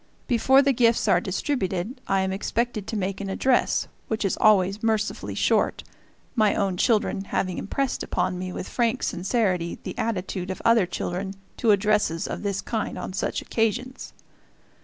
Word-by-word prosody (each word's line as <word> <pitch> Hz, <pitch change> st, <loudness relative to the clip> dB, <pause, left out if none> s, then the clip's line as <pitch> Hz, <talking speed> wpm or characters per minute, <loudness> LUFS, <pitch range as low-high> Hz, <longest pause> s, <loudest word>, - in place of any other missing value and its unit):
Before 265 Hz, +2 st, +5 dB
the 275 Hz, 0 st, +3 dB
gifts 230 Hz, -1 st, +3 dB
are -, -, +4 dB
distributed 195 Hz, +1 st, -2 dB
I 195 Hz, 0 st, +2 dB
am 190 Hz, 0 st, -1 dB
expected 215 Hz, +2 st, -2 dB
to 220 Hz, -, -3 dB
make 195 Hz, 0 st, -2 dB
an 195 Hz, -, -4 dB
address, 250 Hz, +6 st, +2 dB, 0.2 s
which 220 Hz, -1 st, -1 dB
is 195 Hz, -, +1 dB
always 200 Hz, -1 st, +4 dB
mercifully 220 Hz, -1 st, -1 dB
short, -, -, +1 dB, 0.5 s
my 215 Hz, -4 st, +3 dB
own 195 Hz, -2 st, 0 dB
children 205 Hz, -1 st, +1 dB
having 185 Hz, -2 st, -1 dB
impressed 275 Hz, +6 st, -2 dB
upon 180 Hz, 0 st, -1 dB
me 185 Hz, 0 st, -4 dB
with 180 Hz, -, -5 dB
frank 240 Hz, +1 st, 0 dB
sincerity 185 Hz, -3 st, 0 dB
the -, -, -5 dB
attitude 190 Hz, -4 st, -2 dB
of 185 Hz, -, -4 dB
other 230 Hz, -5 st, +5 dB
children 190 Hz, +2 st, -4 dB, 0.2 s
to 230 Hz, -, +1 dB
addresses 205 Hz, -5 st, +2 dB
of -, -, -5 dB
this 200 Hz, -2 st, -2 dB
kind 220 Hz, -2 st, -3 dB
on -, -, -5 dB
such 190 Hz, -, -2 dB
occasions. 240 Hz, +4 st, -2 dB
205 Hz, 160 wpm, -25 LUFS, 190-230 Hz, 0.5 s, Before